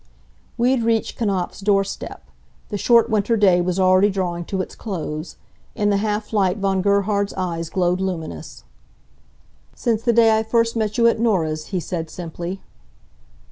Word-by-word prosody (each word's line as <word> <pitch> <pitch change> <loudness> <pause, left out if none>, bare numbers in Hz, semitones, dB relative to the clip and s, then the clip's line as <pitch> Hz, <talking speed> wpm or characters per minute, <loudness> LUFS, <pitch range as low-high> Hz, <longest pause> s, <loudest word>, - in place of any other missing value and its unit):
We 245 +2 +3
had 260 -3 +1
reached 225 -1 0
Knapfs' 195 -6 -1
door 200 0 +3
step. 195 - -7 0.5
The 205 - -3
short 235 +1 +4
winter 215 +2 +2
day 185 -4 +4
was 180 +1 -1
already 185 +2 +5
drawing 175 -3 -2
to 190 - -3
its 185 - -4
close. 160 -6 -5 0.4
In 205 0 +1
the 200 - +2
half 210 +1 -2
light 195 -2 +2
Von 195 -2 0
Gerhard's 200 +1 +1
eyes 170 -3 -3
glowed 180 0 0
luminous. 160 - -5 1.1
"Since 225 -2 0
the 235 - +2
day 225 -1 +5
I - - +1
first 230 +1 +1
met 215 -1 -1
you 235 - +3
at 230 -1 +3
Norah's," 160 -9 0
he 190 - -2
said, 165 0 -4
simply. 175 +2 -6
195 Hz, 165 wpm, -21 LUFS, 180-220 Hz, 1.1 s, already